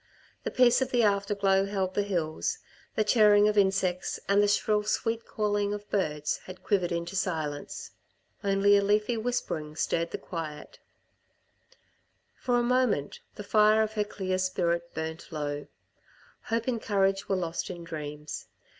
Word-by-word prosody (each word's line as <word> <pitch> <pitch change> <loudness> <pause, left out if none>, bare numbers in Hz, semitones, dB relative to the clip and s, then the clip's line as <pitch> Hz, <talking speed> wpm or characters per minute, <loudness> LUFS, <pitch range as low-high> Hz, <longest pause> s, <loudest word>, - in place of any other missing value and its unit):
The - - 0
peace 250 0 +4
of 260 - 0
the 245 -2 +2
after 200 0 +2
glow 195 -1 +2
held 190 -2 -1
the 205 - +1
hills, 185 - -1 0.4
the 215 - +2
chirring 210 -1 +5
of 210 - +1
insects 190 -2 +1
and 200 +1 +4
the 205 - +3
shrill 210 +1 +2
sweet 225 +2 -1
calling 205 -1 0
of 205 0 -9
birds 150 -7 0
had 185 0 -10
quivered 185 -4 +1
into 170 +2 -3
silence. 155 -6 -3 0.5
Only 200 0 +4
a 200 - +5
leafy 210 +3 +2
whispering 215 -10 -3
stirred 165 +1 0
the - - -4
quiet. 160 -4 -7 1.5
For 245 -1 0
a 240 - +2
moment 245 - +1 0.2
the 210 - -7
fire 215 +1 +4
of 220 0 -3
her 210 -1 +1
clear 190 -2 -3
spirit 170 -2 0
burnt 160 +2 -5
low. 145 -2 -4 0.8
Hope 230 +1 -1
and 235 -3 -1
courage 195 -1 +1
were 195 - +2
lost 170 -2 -3
in 175 -2 -7
dreams. 150 -2 -6
200 Hz, 155 wpm, -28 LUFS, 170-210 Hz, 1.5 s, chirring